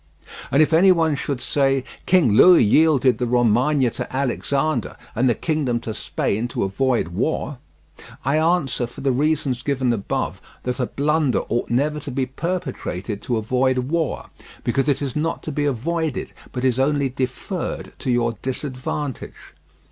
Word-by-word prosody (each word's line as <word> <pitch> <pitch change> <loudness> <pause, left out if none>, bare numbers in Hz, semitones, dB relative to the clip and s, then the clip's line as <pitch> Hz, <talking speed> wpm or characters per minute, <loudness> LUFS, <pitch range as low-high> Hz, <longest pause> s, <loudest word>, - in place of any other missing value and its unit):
And 145 +3 +5
if 155 +1 -1
any 185 +4 +6
one 165 -3 +3
should 140 -1 -3
say: 135 -1 +1 0.2
"King 170 - +4
Louis 180 - +7
yielded 135 +2 +4
the 125 - 0
Romagna 125 +3 +3
to - - -5
Alexander 135 0 -1 0.2
and 125 +3 +2
the 120 - +2
kingdom 145 -7 -1
to 110 - -5
Spain 110 +2 -2
to 120 - -2
avoid 120 +1 0
war," 135 - -2 0.7
I 140 +4 +2
answer 155 -7 +1
for 120 - -11
the 135 -1 +2
reasons 140 -2 0
given 130 -4 0
above 100 -4 -3 0.2
that 125 +1 -3
a 125 - 0
blunder 150 -1 +1
ought 120 - -1
never 145 +5 +1
to 145 - -7
be 130 0 -1
perpetrated 130 - -4
to 120 - -1
avoid 130 +4 +1
war, 150 +5 -2 0.3
because 135 +4 +1
it 140 0 +1
is 135 -3 -3
not 160 +2 -2
to 155 - -4
be 145 0 -1
avoided, 155 +3 -2 0.2
but 125 0 -3
is 130 -1 +2
only 140 0 +2
deferred 130 +7 -4
to 130 - -3
your 120 -1 +2
disadvantage. 130 +1 -5
135 Hz, 160 wpm, -22 LUFS, 125-150 Hz, 0.7 s, Louis